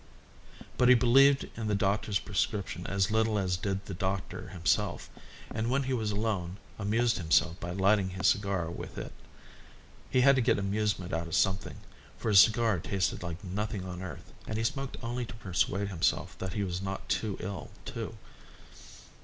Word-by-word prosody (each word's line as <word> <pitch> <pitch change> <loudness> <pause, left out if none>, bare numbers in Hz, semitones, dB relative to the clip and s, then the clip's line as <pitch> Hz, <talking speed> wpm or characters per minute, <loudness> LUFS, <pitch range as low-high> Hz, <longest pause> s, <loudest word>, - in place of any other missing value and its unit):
But 125 - +5
he 125 - +9
believed 135 +4 +5
in 110 -2 -3
the 105 - +1
doctor's 100 +1 +1
prescription 100 -3 -2
as 100 0 +1
little 110 -1 +2
as 95 -3 0
did 95 +1 -3
the 100 - -6
doctor 95 0 -3
himself, 90 +2 0 0.4
and 115 +1 -1
when 135 +2 +2
he 130 0 -1
was 110 -4 -1
alone 100 -4 -2 0.2
amused 115 +3 +1
himself 85 0 +2
by 85 - -5
lighting 95 +2 +2
his 95 0 -4
cigar 100 -5 +1
with - - -8
it. - - -5 1.0
He 130 - +3
had 135 +1 +6
to - - +3
get 120 - +3
amusement 100 -2 -1
out 85 0 -1
of 80 - -2
something, 95 -1 +1 0.4
for - - -2
his 100 -3 +8
cigar 110 -2 +5
tasted 95 +3 -1
like 85 +3 -6
nothing 100 +1 -3
on 90 -1 -6
earth, 95 - -8
and 110 - -2
he 115 - -1
smoked 135 +3 -2
only 120 +1 -2
to 100 -4 -8
persuade 100 -1 -1
himself 85 -5 0
that 95 -1 -4
he 105 -2 -1
was 90 -1 -3
not 95 0 -5
too 100 0 -1
ill 100 +2 -5 0.2
to. 115 -1 -5
100 Hz, 180 wpm, -30 LUFS, 95-110 Hz, 1.0 s, he